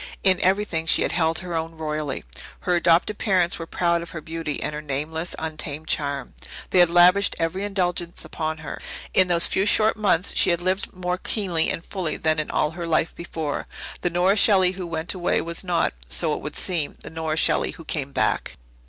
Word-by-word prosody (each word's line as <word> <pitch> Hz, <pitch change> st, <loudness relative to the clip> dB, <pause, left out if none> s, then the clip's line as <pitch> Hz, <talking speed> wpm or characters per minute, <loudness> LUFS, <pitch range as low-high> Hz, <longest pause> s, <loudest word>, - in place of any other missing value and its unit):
In 190 Hz, -2 st, +4 dB
everything 185 Hz, -4 st, +1 dB
she -, -, +4 dB
had -, -, 0 dB
held 160 Hz, -2 st, +1 dB
her 175 Hz, -, -5 dB
own 165 Hz, 0 st, -4 dB
royally. 150 Hz, -3 st, -3 dB, 0.4 s
Her 180 Hz, -, +1 dB
adopted 175 Hz, +4 st, +2 dB
parents 185 Hz, -5 st, +1 dB
were 165 Hz, -, -6 dB
proud 170 Hz, 0 st, +1 dB
of 170 Hz, -, -8 dB
her 170 Hz, -, -6 dB
beauty 160 Hz, -1 st, -4 dB
and -, -, -3 dB
her 150 Hz, -, -5 dB
nameless, 155 Hz, +4 st, -3 dB
untamed 155 Hz, -1 st, -5 dB
charm. 140 Hz, -3 st, -2 dB, 0.4 s
They 185 Hz, -, +4 dB
had 175 Hz, -1 st, +6 dB
lavished 180 Hz, +3 st, +5 dB
every 165 Hz, +4 st, -2 dB
indulgence 180 Hz, -4 st, -2 dB
upon 160 Hz, -1 st, -3 dB
her. -, -, -6 dB, 0.3 s
In 185 Hz, -, +5 dB
those 170 Hz, -1 st, +4 dB
few 190 Hz, -, +1 dB
short 215 Hz, +1 st, +4 dB
months 200 Hz, -4 st, +2 dB
she -, -, +4 dB
had 170 Hz, -1 st, +2 dB
lived 185 Hz, +2 st, -1 dB
more 180 Hz, 0 st, -3 dB
keenly 180 Hz, -8 st, +1 dB
and 165 Hz, -, -4 dB
fully 180 Hz, -6 st, -3 dB
than 155 Hz, 0 st, +1 dB
in 155 Hz, -, -2 dB
all 150 Hz, -, +1 dB
her 170 Hz, +1 st, -6 dB
life 160 Hz, 0 st, +1 dB
before. 160 Hz, -3 st, -4 dB, 0.3 s
The 175 Hz, -, 0 dB
Nora 180 Hz, +4 st, +2 dB
Shelley 190 Hz, -4 st, +5 dB
who 185 Hz, -1 st, -6 dB
went 165 Hz, 0 st, -2 dB
away 180 Hz, -2 st, 0 dB
was 170 Hz, +2 st, -2 dB
not, 180 Hz, -2 st, 0 dB, 0.2 s
so 60 Hz, -, +3 dB
it -, -, -4 dB
would -, -, -6 dB
seem, 165 Hz, -6 st, -1 dB
the -, -, -8 dB
Nora 160 Hz, -1 st, -3 dB
Shelley -, -, +2 dB
who 165 Hz, -, -10 dB
came 140 Hz, -3 st, -3 dB
back. -, -, 0 dB
170 Hz, 205 wpm, -23 LUFS, 160-180 Hz, 0.4 s, had